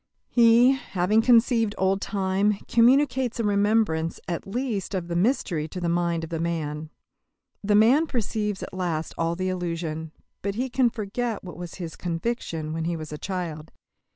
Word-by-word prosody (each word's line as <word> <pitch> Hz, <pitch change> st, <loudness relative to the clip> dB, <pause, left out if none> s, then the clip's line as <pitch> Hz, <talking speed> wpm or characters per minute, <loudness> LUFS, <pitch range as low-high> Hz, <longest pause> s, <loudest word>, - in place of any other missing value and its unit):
He, 235 Hz, +1 st, +6 dB
having 215 Hz, -5 st, +1 dB
conceived 230 Hz, -2 st, +3 dB
old 190 Hz, +1 st, +1 dB
time, 195 Hz, +1 st, +1 dB
communicates 255 Hz, 0 st, +3 dB
a -, -, +1 dB
remembrance 205 Hz, -5 st, +1 dB
at 170 Hz, +1 st, -4 dB
least 215 Hz, -3 st, -2 dB
of 175 Hz, -2 st, -3 dB
the 170 Hz, -, -2 dB
mystery 175 Hz, -, +1 dB
to 180 Hz, -, -7 dB
the 175 Hz, -1 st, -1 dB
mind 170 Hz, -1 st, 0 dB
of 165 Hz, -, -7 dB
the 165 Hz, -, -2 dB
man. 155 Hz, -2 st, -3 dB, 0.7 s
The 205 Hz, +1 st, +2 dB
man 250 Hz, +10 st, +5 dB
perceives 210 Hz, -5 st, -2 dB
at -, -, -8 dB
last 170 Hz, -4 st, -2 dB
all 165 Hz, 0 st, -1 dB
the 185 Hz, +1 st, -2 dB
illusion, 165 Hz, -3 st, -3 dB, 0.3 s
but 200 Hz, 0 st, -2 dB
he 250 Hz, +3 st, -2 dB
cannot 245 Hz, -2 st, +2 dB
forget 225 Hz, +1 st, -3 dB
what 180 Hz, -, -8 dB
was 175 Hz, -1 st, -8 dB
his 170 Hz, -4 st, -6 dB
conviction 165 Hz, -3 st, -3 dB
when 165 Hz, 0 st, -2 dB
he 170 Hz, 0 st, -1 dB
was 155 Hz, -1 st, -7 dB
a 150 Hz, -, -6 dB
child. 170 Hz, -5 st, -5 dB
190 Hz, 170 wpm, -25 LUFS, 170-230 Hz, 0.7 s, He